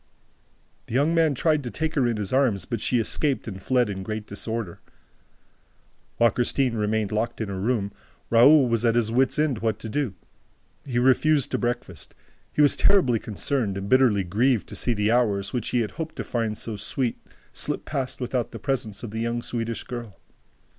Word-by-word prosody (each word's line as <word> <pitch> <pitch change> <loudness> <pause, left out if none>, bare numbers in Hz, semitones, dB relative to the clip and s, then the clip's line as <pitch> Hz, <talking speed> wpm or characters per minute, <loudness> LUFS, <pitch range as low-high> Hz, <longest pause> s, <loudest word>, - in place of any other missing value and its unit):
The 115 - -5
young 145 +5 +3
man 160 -4 +3
tried 155 +3 +2
to 120 - -4
take 160 +5 -3
her 135 -5 +2
in 115 -2 -1
his 105 0 -4
arms, 130 -8 +2
but 115 -3 -4
she 125 - +1
escaped 135 +4 -1
and 95 -3 -6
fled 125 +2 +2
in 95 -2 -4
great 110 +2 -5
disorder. 105 -2 -5 1.4
While 115 -1 +5
Christine 125 +2 +1
remained 110 -1 -1
locked 115 +2 -2
in 110 -3 -3
her 95 -1 -4
room, 105 -1 0 0.4
Raoul 130 +4 +7
was 115 -1 0
at 115 -1 +3
his 115 -2 +1
wit's 130 +2 +2
end 150 -6 +1
what 110 -1 -1
to 110 - -7
do. 130 -5 -2 0.7
He 125 -3 -2
refused 135 +3 +3
to - - 0
breakfast. 120 -9 -4 0.4
He 150 - +3
was 145 - +5
terribly 130 - +3
concerned 110 -1 -2
and 100 0 -5
bitterly 120 -5 +4
grieved 110 +6 +1
to - - -8
see 120 - 0
the 105 +1 +1
hours, 100 -5 +1
which 120 -3 -2
he 125 - +1
had 110 - -3
hoped 160 -1 -6
to - - -4
find 115 -3 -2
so 110 -2 -4
sweet, 120 +4 -1 0.3
slip - - -1
past 135 -4 -3
without 125 -1 -2
the - - -8
presence 120 -7 -3
of 115 - -6
the 110 - -4
young 115 +1 -2
Swedish 115 -2 -3
girl. 120 -6 -8
120 Hz, 195 wpm, -25 LUFS, 105-130 Hz, 1.4 s, Raoul